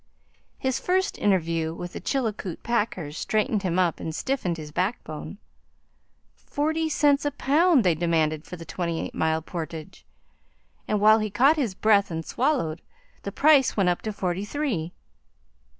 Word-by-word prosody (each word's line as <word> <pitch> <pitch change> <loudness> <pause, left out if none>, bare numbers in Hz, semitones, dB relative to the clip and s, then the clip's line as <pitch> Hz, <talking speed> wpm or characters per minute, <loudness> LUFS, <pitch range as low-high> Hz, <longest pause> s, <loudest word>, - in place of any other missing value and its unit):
His 260 -1 -1
first 375 +2 0
interview 165 -4 +1
with 175 +1 -7
the - - -6
Chilkoot 220 - -3
packers 200 -10 -2
straightened 215 -1 0
him 180 -2 -1
up 180 -3 +1
and 160 -1 -5
stiffened 220 -10 -1
his 150 -2 -8
backbone. 180 -1 -3 1.0
Forty 315 +2 -1
cents 290 -2 +3
a 290 - +1
pound 290 +1 +3
they 180 -3 +4
demanded 155 -2 0
for 180 - -8
the 165 -1 -10
twenty 170 -2 -3
eight - - -5
mile 160 0 0
portage, 160 -2 -7 0.8
and 210 - +1
while 215 +2 +6
he 215 0 -2
caught 265 +9 +4
his 245 -11 -1
breath 205 -1 +3
and 165 -1 -4
swallowed, 245 - 0 0.4
the - - -5
price 285 -5 +4
went 190 -3 +3
up 175 - 0
to 215 - -3
forty 190 -2 -2
three. 210 - -2
200 Hz, 155 wpm, -25 LUFS, 165-265 Hz, 1.0 s, while